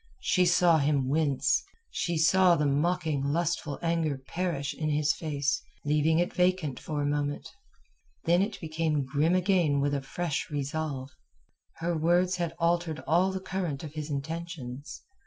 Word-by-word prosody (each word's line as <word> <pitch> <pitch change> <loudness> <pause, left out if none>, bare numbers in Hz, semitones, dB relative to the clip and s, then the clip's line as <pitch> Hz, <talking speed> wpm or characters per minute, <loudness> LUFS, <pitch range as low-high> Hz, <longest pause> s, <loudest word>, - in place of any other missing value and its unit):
She 180 -1 +3
saw 170 -2 +5
him 140 -2 +1
wince; 145 -2 +2 0.3
she 170 -1 -1
saw 180 +2 +5
the 150 - 0
mocking 150 0 +1
lustful 155 0 -1
anger 165 -4 0
perish 145 +1 -3
in 155 -1 -2
his 150 +1 +2
face, 145 -4 -1 0.2
leaving 150 +2 +2
it 175 +1 +1
vacant 180 -6 +1
for 150 -2 -3
a - - 0
moment. 145 0 -1 0.8
Then 175 +2 +3
it 205 +2 -2
became 155 -3 -1
grim 150 +6 +1
again 180 -6 +2
with 140 +1 +1
a 140 - 0
fresh 155 +2 -3
resolve. 145 -2 -3 0.6
Her 170 +1 -2
words 175 +3 +2
had 170 -2 -2
altered 170 -2 0
all 175 +6 +3
the 190 - -3
current 180 -7 -3
of 150 -2 -7
his 155 -1 -5
intentions. 145 -2 -6
160 Hz, 155 wpm, -28 LUFS, 145-175 Hz, 0.8 s, saw